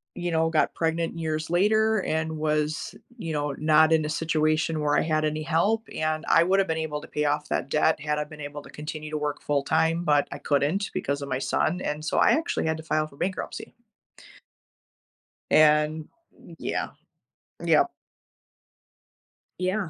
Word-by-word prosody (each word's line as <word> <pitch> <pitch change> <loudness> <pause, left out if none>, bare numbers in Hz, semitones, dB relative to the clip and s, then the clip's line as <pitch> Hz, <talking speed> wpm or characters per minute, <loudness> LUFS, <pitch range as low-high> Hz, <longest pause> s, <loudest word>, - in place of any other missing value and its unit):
you 175 -1 -3
know, 165 0 +2
got 160 -2 +1
pregnant 165 0 -1
years 155 -1 -2
later 215 +4 +3
and 160 -2 -2
was, 155 0 -1 0.2
you 165 -8 -5
know, 145 -1 -1
not 155 +1 +4
in 155 -1 +3
a - - -3
situation 155 0 0
where 145 -1 +2
I - - +3
had 155 -1 0
any 155 0 -2
help, 200 +8 +1
and 155 0 -1
I 165 - +6
would 190 +2 +2
have 195 - +2
been 160 0 -1
able 150 -2 -3
to - - -11
pay 150 - -2
off 145 - 0
that 135 - -1
debt 155 +2 +2
had 150 0 -1
I - - 0
been 150 0 -12
able 145 0 -6
to - - -14
continue 155 0 -7
to 155 - -1
work 150 -1 -3
full 145 -1 0
time, 160 +3 +1
but 145 -3 +3
I 145 - -5
couldn't 150 +9 0
because 140 +1 -2
of 140 - -5
my 130 - -1
son, 175 +5 0
and 150 +1 -3
so 155 - -1
I - - +5
actually 320 - 0
had 160 0 0
to 160 - -9
file 155 -1 0
for 140 - -18
bankruptcy. 190 +4 -4 1.8
And 150 0 +4 0.5
yeah. - - -2 0.7
Yep. - - +4 1.7
Yeah. 185 0 -1
155 Hz, 180 wpm, -26 LUFS, 150-165 Hz, 1.8 s, I